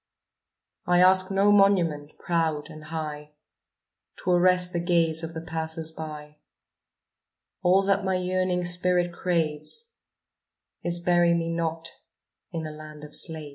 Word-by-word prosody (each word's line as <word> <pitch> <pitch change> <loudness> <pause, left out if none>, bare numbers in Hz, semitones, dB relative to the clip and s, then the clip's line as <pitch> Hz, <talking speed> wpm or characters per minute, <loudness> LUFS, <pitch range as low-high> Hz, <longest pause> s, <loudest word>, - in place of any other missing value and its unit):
I 175 0 +3
ask 185 +1 +5
no 195 +1 +3
monument, 175 -8 +2
proud 165 -2 -2
and 155 0 -11
high, 150 -1 -6 0.9
To 180 - 0
arrest 180 0 +3
the 170 - -1
gaze 170 -2 +1
of 165 0 -6
the 160 - -5
passers 160 0 -3
by; 150 -1 -9 1.2
All 185 +2 +3
that 195 0 +1
my 190 -1 0
yearning 185 0 -1
spirit 175 0 +3
craves, 170 - -1 0.9
Is 175 0 0
bury 175 0 +2
me 165 0 -2
not 165 -1 -3 0.6
in 165 -2 -4
a 155 - -6
land 150 0 -11
of 150 0 -9
slaves. 155 -2 -1
170 Hz, 135 wpm, -25 LUFS, 155-180 Hz, 1.2 s, ask